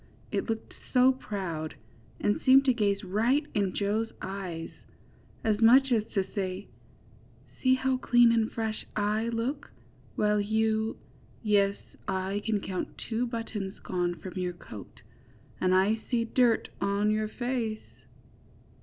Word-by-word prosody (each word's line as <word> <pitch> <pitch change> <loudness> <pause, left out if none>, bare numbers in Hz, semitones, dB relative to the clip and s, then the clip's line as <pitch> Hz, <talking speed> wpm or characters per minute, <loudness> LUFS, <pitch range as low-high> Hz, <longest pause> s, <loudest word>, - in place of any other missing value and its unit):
It - - -2
looked 225 0 -3 0.2
so 255 +1 +7
proud, 185 -11 -4 0.4
and 205 - +1
seemed 270 +1 +6
to 260 - +4
gaze 205 -3 0
right 230 +10 +1
in 200 -3 0
Joe's 215 +3 0
eyes, 185 -4 -5 0.7
as 215 0 +1
much 260 +4 +6
as 225 -3 +3
to 195 -2 +2
say, 190 -1 -3 1.0
^^See 260 0 +5
how 260 0 +1
clean 240 -2 +5
and 225 -1 +2
fresh 220 -1 -3
I 215 +2 0
look, 235 +5 -3 0.5
while 210 - +2
you— 220 +1 0 0.5
yes, 200 -2 +3 0.3
I 190 +2 -1
can 215 -2 0
count 185 -2 -4
two 235 +2 -2
buttons 225 -4 -4
gone 175 -1 -2
from 185 +1 -9
your 180 -1 -1
coat, 110 - -11 0.6
and 185 0 +3
I 210 +4 +3
see 235 -2 +1
dirt 235 -1 +2
on 200 +1 +2
your 215 0 0
face." 235 -2 -4
215 Hz, 135 wpm, -29 LUFS, 195-230 Hz, 1.0 s, so